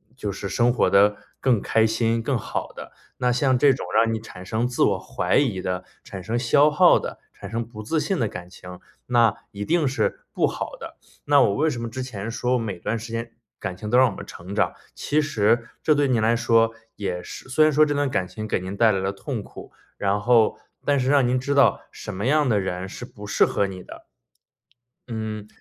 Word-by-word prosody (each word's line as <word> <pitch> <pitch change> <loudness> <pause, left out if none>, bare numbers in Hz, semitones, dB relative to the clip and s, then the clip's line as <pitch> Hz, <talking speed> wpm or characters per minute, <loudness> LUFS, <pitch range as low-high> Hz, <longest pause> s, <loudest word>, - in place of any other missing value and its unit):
就 105 -6 -4
是 100 +1 -5
生 120 0 +2
活 - - +2
得 105 +1 +4 0.2
更 125 -6 +2
开 110 0 +2
心、 115 +1 0
更 130 -1 0
好 - - -4
的。 - - -10 0.3
那 125 0 +1
像 130 +1 +2
这 140 -2 +5
种 - - -5
让 115 0 +4
你 110 - -2
产 90 -4 -11
生 110 +4 -1
自 125 - -3
我 - - +2
怀 - - -1
疑 115 -10 +1
的、 90 0 -3 0.2
产 95 -2 -8
生 115 +5 -1
消 145 +5 +4
耗 180 +3 +6
的、 - - -7 0.2
产 - - -9
生 115 +1 -1
不 110 -2 -9
自 155 +8 0
信 190 +3 -1
的 115 - +1
感 90 -3 -8
情， 90 0 -11 0.3
那 120 -4 +3 0.2
一 100 0 -5
定 165 0 +2
是 130 - -1
不 - - +2
好 - - -4
的。 - - -9 0.3
那 145 0 +5
我 100 -5 +3
为 155 +2 +2
什 120 - -4
么 115 - -3
之 130 +3 -5
前 110 -3 -6
说 125 +2 0
每 100 -6 -4
段 115 - -2
时 115 +1 -8
间 115 0 -4 0.3
感 95 -1 -5
情 105 +2 -6
都 125 - +4
让 130 -2 +5
我 95 - -8
们 - - -8
成 95 +4 -9
长， - - +1 0.2
其 150 +1 0
实 115 -4 +1
这 155 - +4
对 145 -1 +2
你 120 -3 +2
来 115 +2 +3
说 115 -1 +3 0.2
也 95 -4 -3
是 - - -10
虽 155 +4 +4
然 155 - +5
说 155 +2 +5
这 145 - -1
段 145 -1 0
感 95 -7 -1
情 110 +3 -7
给 - - 0
您 95 +2 -6
带 110 +1 +4
来 95 - 0
了 95 +1 -1
痛 105 +2 -5
苦， - - -12 0.3
然 100 +1 0
后 115 0 +3 0.3
但 145 -1 +2
是 130 - -1
让 140 -3 +4
您 125 +1 +1
知 140 +3 -1
道 140 0 +4
什 - - -8
么 100 +4 -4
样 150 -1 +3
的 105 -3 +3
人 95 0 -4
是 125 - -8
不 105 -4 -11
适 - - +4
合 100 - 0
你 95 -1 -8
的。 - - -12 1.0
嗯， 110 -2 -5
115 Hz, 250 characters per minute, -23 LUFS, 100-130 Hz, 1.0 s, 耗